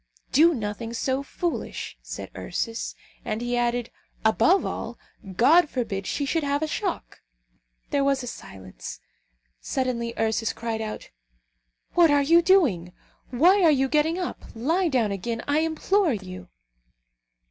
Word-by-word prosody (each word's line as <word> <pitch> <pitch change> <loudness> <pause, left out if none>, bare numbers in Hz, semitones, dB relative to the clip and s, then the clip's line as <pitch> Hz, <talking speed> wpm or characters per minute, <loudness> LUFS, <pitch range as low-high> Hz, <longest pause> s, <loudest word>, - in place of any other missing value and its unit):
"Do 325 +3 +5
nothing 225 +1 -4
so 260 +3 0
foolish," 335 +4 -4
said - - -8
Ursus. 230 -1 -4 0.3
And 215 -1 -3
he 240 +1 -2
added, 240 0 0 0.3
"Above 340 - +4
all, - - -5 0.4
God 310 - +5
forbid 200 -8 -3
she 285 - -1
should 325 +4 0
have 285 +1 0
a - - 0
shock!" 370 +3 -4 0.7
There 280 - +2
was 275 -1 +1
a - - -5
silence. 95 - -9 0.6
Suddenly 240 -3 -2
Ursus 225 0 0
cried 225 -1 -3
out, 215 -1 -6 0.8
"What 345 -2 +6
are 290 -1 +4
you 335 +4 +5
doing? 265 - +3 0.4
Why 350 +11 +4
are 335 - +6
you 270 -3 +3
getting 305 +4 +1
up? 360 -2 -4
Lie 325 +11 +1
down 240 -7 +1
again, 230 +5 -3
I 290 +1 +2
implore 325 +2 +1
of 200 -4 -5
you." 185 0 -9
260 Hz, 145 wpm, -25 LUFS, 225-320 Hz, 0.8 s, What